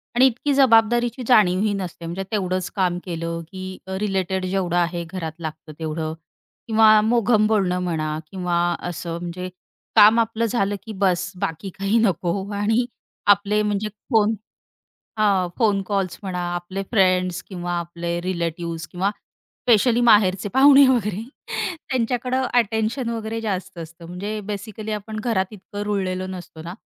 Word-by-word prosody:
आणि 250 +2 +6
इतकी 265 +3 +1
जबाबदारीची 240 -1 +4
जाणीवही 205 -3 +4
नसते. 180 -3 -5
म्हणजे 175 +3 -4
तेवढंच 185 -3 -1
काम 180 -2 +1
केलं, 165 -1 -3
की 185 0 -7
अ, 190 0 -3
रिलेटेड 190 -2 -1
जेवढं 185 -2 -1
आहे 175 0 0
घरात 170 -4 -4
लागतं 155 -1 -7
तेवढं 155 0 -3 0.5
किंवा 220 -1 +6
मोघम 220 -1 +3
बोलणं 190 -4 +1
म्हणा 155 -3 -2
किंवा 180 -2 -2 0.3
असं 170 0 -5
म्हणजे 175 +1 -5 0.5
काम 220 +2 +8
आपलं 230 0 0
झालं, 205 -3 0
की 220 - -7
बस 185 -2 0
बाकी 165 +4 -3
काही 195 +3 +2
नको. 190 -1 0
आणि 220 +4 +1 0.4
आपले 205 +1 +4
म्हणजे 210 0 -1 0.2
फोन 220 -1 +3 0.8
हां, 195 -4 +3
फोन 205 -4 +2
कॉल्स 195 -3 -2
म्हणा, 185 -2 -3 0.2
आपले 180 +3 -4
फ्रेंड्स 185 -4 +2
किंवा 175 -2 -5
आपले 170 0 -4
रिलेटिव्हज 170 -2 -3
किंवा 185 +3 0
स्पेशली 235 +2 0
माहेरचे 205 -4 +4
पाहुणे 275 +4 +7
वगैरे 210 -6 +1 0.7
त्यांच्याकडं 255 +1 0
अटेन्शन 230 +1 +1
वगैरे 225 -1 -3
जास्त 195 -5 -4
असतं. 165 +1 -9
म्हणजे 200 +5 -5
बेसिकली 210 +1 -5
आपण 215 +1 -4
घरात 215 -4 0
इतकं 205 0 -8
रुळलेलो 185 -3 -2
नसतो 180 -3 -8
ना, 170 +2 -7
195 Hz, 140 wpm, -22 LUFS, 180-220 Hz, 0.8 s, काम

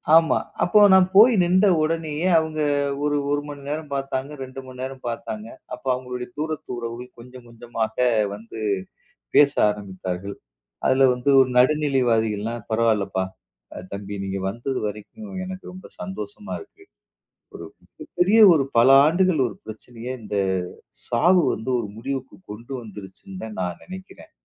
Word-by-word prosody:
ஆமா. 165 0 +5 0.3
அப்போ 210 +4 +4
நான் 190 -1 +6
போய் 225 +5 +8
நின்ட 185 +3 +3 0.2
உடனேயே 160 +1 -1
அவங்க 160 -1 -4 0.4
ஒரு 145 0 +1 0.2
1 145 0 +1
மணி 145 -1 -8
நேரம் 150 0 -4
பாத்தாங்க. 135 0 -3
2 130 0 -9
மணி 130 -1 -12
நேரம் 130 0 -6
பாத்தாங்க. 110 -2 -5 0.3
அப்ப 125 +2 -9
அவங்களுடைய 125 -1 -5
தூரத்து 155 0 -4
உறவுகள் 120 +1 -7
கொஞ்சம் 125 +1 -13
கொஞ்சமாக 115 -1 -4 0.4
வந்து 115 +1 -10 0.8
பேச 145 -1 +6 0.2
ஆரம்பித்தார்கள். 100 -1 -5 0.5
அதுல 130 0 +5
வந்து 125 +3 -2
ஒரு 130 - +2
நடுநிலைவாதிகள்லாம் 120 -6 +1
பரவால்லப்பா. 110 -4 +1 0.7
தம்பி 100 0 -6
நீங்க 95 0 -3
வந்தது 120 +5 -3
வரைக்கும் 150 - -9
எனக்கு 185 0 -8
ரொம்ப 185 0 -11
சந்தோஷமா 205 - -7
இருக்கு. 400 -1 -16 0.7
ஒரு - - -8 0.2
மிக - - -14
பெரிய 195 +6 +5
ஒரு 150 -4 +2
பல 120 +3 +6 0.2
ஆண்டுகள் 175 +1 +2
ஒரு - - -8
பிரச்சனைய 115 +2 -9
இந்தச் 100 -3 -1 0.5
சாவு 175 +9 +3
வந்து 110 +4 -5
ஒரு 115 - -3
முடிவுக்குக் 135 +8 -6
கொண்டு 115 +6 -9
வந்துருச்சுன்னு 100 -1 -10
நான் 90 -2 -3
நெனைக்கிறேன். 190 +11 -11
130 Hz, 135 wpm, -23 LUFS, 110-155 Hz, 0.8 s, போய்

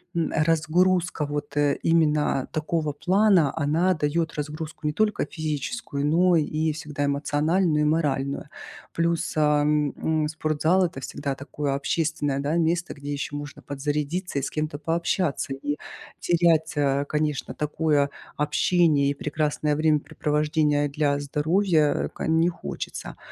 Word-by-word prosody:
м, 165 - 0
разгрузка 165 +2 +2
вот 145 0 -4 0.3
именно 150 -4 +2
такого 155 -1 -1
плана, 185 -1 +3
она 160 +5 +2
дает 160 +1 -1
разгрузку 150 +1 -5
не 150 - 0
только 215 +5 +1
физическую, 155 - -3
но 175 +2 +4
и 155 +1 0
всегда 150 -1 -4
эмоциональную 150 +3 +1
и - - +3
моральную. 145 -3 0 0.5
Плюс, 170 -1 0
ам, 150 -1 +2 0.3
м, - - 0
спортзал- 160 +4 +1
это 135 -6 -5
всегда 140 0 -4
такое 140 0 -3
общественное, 145 -1 -1
да, 145 +3 -1
место, 170 +1 0
где 145 0 -7
еще 145 0 -4
можно 145 -1 -7
подзарядиться 145 +4 -2
и - - -3
с - - -3
кем-то 155 -1 -3
пообщаться, 165 -3 -1
и 145 +2 -3 0.5
терять, 170 -2 +2 0.4
конечно, 150 -2 -1
такое 150 -1 +1 0.3
общение 150 -1 +2
и - - -1
прекрасное 150 0 -1
времяпрепровождение 150 -1 +1
для 145 0 0
здоровья 155 +2 +1
ка - - -4
не 160 +1 +3
хочется. 170 - -6
150 Hz, 125 wpm, -25 LUFS, 145-165 Hz, 0.5 s, но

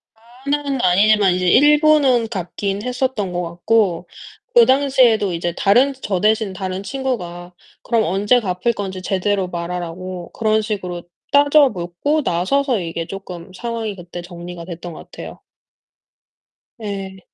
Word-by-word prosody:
다 220 - -30 0.2
그날은 280 -2 -1
아니지만 195 +1 +4
이제 180 0 -1
일부는 295 - +5
갚긴 195 0 -3
했었던 250 -6 -2
것 175 - -1
같고 175 +1 0 0.5
그 235 - +8
당시에도 255 -8 +3
이제 170 0 -2
다른 250 +8 +4
저 190 -3 -1
대신 215 -2 +2
다른 185 +1 -4
친구가 180 -9 -4 0.3
그럼 230 -2 +1
언제 205 +7 +2
갚을 195 +2 -1
건지 190 -3 -5
제대로 195 0 0
말하라고 175 +1 -5
그런 220 -1 +1
식으로 185 -5 -4 0.3
따져 285 0 +5
묻고 180 - -2
나서서 240 - +1
이게 165 -1 -4
쪼끔 190 -2 -8
상황이 225 0 -4
그때 175 -1 -8
정리가 175 -1 -9
됐던 175 -1 -8
것 - - -12
같아요. - - -9 1.4
예. 195 -2 -5
195 Hz, 290 characters per minute, -19 LUFS, 180-240 Hz, 1.4 s, 그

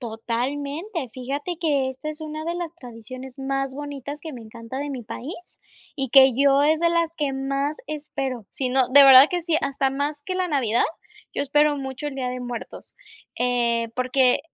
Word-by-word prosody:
Totalmente, 280 - -3
fíjate 280 +7 -4
que 285 -5 +1
esta 265 +4 -7
es 305 +1 -6
una 310 0 -6
de 340 +1 -2
las 345 -1 -5
tradiciones 255 0 -10
más 270 0 -2
bonitas 285 0 -6
que 315 -1 -7
me 245 - -8
encanta 230 +3 -8
de 290 0 -3
mi 255 -3 -5
país, 255 +7 -7 0.6
y 270 -3 -2
que 265 +1 +7
yo 275 +1 +4
es 310 +2 +3
de 340 - +4
las 335 -1 +2
que 285 -3 -1
más 275 +2 -2
espero. 275 -6 -4
Si 260 -2 -2
no 260 0 +2
de 280 +2 +8
verdad 270 +2 +10
que 355 -1 -1
sí, 325 -2 +1
hasta 270 -1 0
más 290 +2 -3
que 370 - -3
la 370 -1 0
Navidad. 240 -6 +2 0.5
Yo - - -1
espero 295 +1 +3
mucho 265 +2 -5
el 285 - -8
Día 260 -2 -2
de 250 0 -4
Muertos, 245 -2 -7 0.4
eh, 235 -2 +1
porque 255 +1 +3
275 Hz, 190 wpm, -24 LUFS, 255-295 Hz, 0.6 s, verdad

